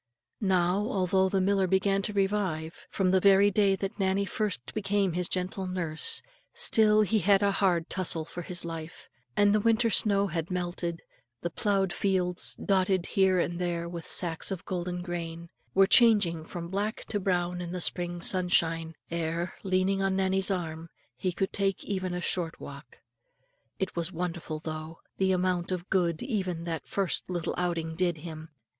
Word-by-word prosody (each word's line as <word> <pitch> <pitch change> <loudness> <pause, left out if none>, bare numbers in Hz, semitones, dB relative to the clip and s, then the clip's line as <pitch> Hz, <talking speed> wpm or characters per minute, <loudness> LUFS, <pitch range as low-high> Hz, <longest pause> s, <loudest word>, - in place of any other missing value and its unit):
Now 185 -3 +2
although 190 -2 +1
the 195 - +1
miller 195 0 +2
began 195 +1 +2
to 205 - -2
revive, 195 -5 -1
from 185 -2 +1
the 190 - +4
very 200 +1 +5
day 200 -1 +3
that 195 +2 -5
Nannie 195 +1 +1
first 200 - -3
became 200 -3 0
his 180 0 -1
gentle 185 +1 -2
nurse, 180 - 0 0.3
still 220 - +5
he 215 +1 +2
had 200 +2 +3
a 200 - +3
hard 180 -4 +1
tussle 170 -4 -1
for 170 +2 -7
his 175 0 -4
life; 165 -1 -7 0.3
and 205 0 +5
the 215 - +3
winter's 230 +1 +3
snow 200 -2 +3
had 170 -3 -3
melted, 175 -2 -3 0.4
the 170 - -3
ploughed 195 -2 0
fields 180 -2 +2
dotted 190 -2 +1
here 190 -1 +3
and 175 0 -1
there 170 -1 -2
with 170 -1 -7
sacks 165 -3 +3
of 190 -2 -5
golden 180 -1 -3
grain 170 -1 -5 0.3
were 195 0 +6
changing 200 -8 +5
from 170 0 -7
black 205 +4 -3
to 205 - -1
brown 180 -2 -1
in 175 -1 -5
the 180 - -3
spring 175 0 -2
sunshine, 165 -3 +2 0.2
ere, 170 +1 -2
leaning 190 +1 +1
on 195 0 +1
Nannie's 190 0 +1
arm, 165 -3 -3 0.3
he 180 +9 -2
could 190 +2 -2
take 195 -2 0
even 185 -2 -2
a 180 - -3
short 170 -2 -1
walk. 140 +1 -11 0.8
It 190 - -3
was 170 +1 -2
wonderful, 170 -2 -4
though, 155 +1 -6 0.2
the 190 0 +2
amount 180 -1 0
of 180 0 -4
good 170 -4 +1
even 190 -9 -2
that 165 -4 -4
first 195 -2 -2
little 175 -3 -2
outing 170 -2 -2
did 175 -1 0
him. 160 -1 -8
185 Hz, 170 wpm, -28 LUFS, 170-195 Hz, 0.8 s, were